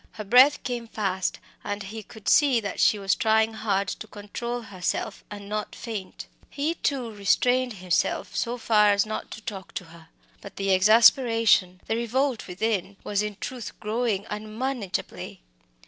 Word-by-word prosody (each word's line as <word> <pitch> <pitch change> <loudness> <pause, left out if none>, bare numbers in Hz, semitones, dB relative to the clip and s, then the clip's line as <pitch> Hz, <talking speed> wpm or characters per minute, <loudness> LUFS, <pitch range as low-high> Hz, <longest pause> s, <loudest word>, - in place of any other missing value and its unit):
Her 215 - -6
breath 250 +7 +6
came 240 -2 -4
fast, 190 -4 -2 0.3
and 205 0 -4
he 215 +3 -7
could 220 0 -14
see 280 -5 +5
that 200 -3 -5
she 215 - +4
was 195 -1 +1
trying 220 0 +2
hard 200 -3 0
to - - -6
control 235 +4 -5
herself 200 0 -3
and 205 -1 -8
not 210 +1 -3
to - - -11
faint. 215 -5 -6 0.2
He, 295 +3 -1
too, 265 -8 -2
restrained 245 +5 +2
himself 180 -3 -1
so 240 +1 -1
far 210 -3 +4
as 200 +1 +2
not 215 0 -5
to 220 - -9
talk 195 -4 -8
to - - -3
her. 165 -1 -15 0.3
But 200 - -11
the 195 0 0
exasperation, 220 -2 +5
the 220 - -1
revolt 245 +2 -1
within, 195 +1 -2
was 205 -1 0
in 210 -1 -3
truth 250 -4 -6
growing 215 -2 -1
unmanageably. 215 - -4
215 Hz, 165 wpm, -26 LUFS, 200-235 Hz, 0.3 s, breath